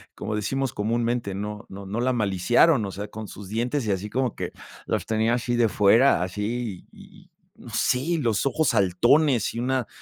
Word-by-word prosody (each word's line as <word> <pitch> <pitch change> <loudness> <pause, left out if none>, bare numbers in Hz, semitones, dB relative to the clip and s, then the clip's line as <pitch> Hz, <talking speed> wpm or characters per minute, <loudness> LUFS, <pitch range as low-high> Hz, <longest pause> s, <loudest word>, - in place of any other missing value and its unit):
como 105 0 -4
decimos 135 +5 -2
comúnmente, 115 -1 -1
no 105 +2 -5
no 100 0 -9
no 105 +5 -4
la 130 +1 +1
maliciaron, 110 - +3
o 95 - -5
sea, 100 +3 -6
con 110 -1 -7
sus 100 0 -10
dientes 120 +4 -1
y 105 - 0
así 100 +2 -2
como 125 0 -1
que - - -4 0.3
los - - -2
tenía 110 +1 +1
así 120 0 -1
de 115 -1 +4
fuera, 105 +1 +4
así 105 +2 -4
y - - -17 0.3
no - - -13
sé, 125 - +1
y 165 +5 -1
los 115 -4 0
ojos 145 +3 +1
saltones 120 - +3
y 115 - -4
una 130 -1 -1
115 Hz, 190 wpm, -25 LUFS, 105-125 Hz, 0.3 s, de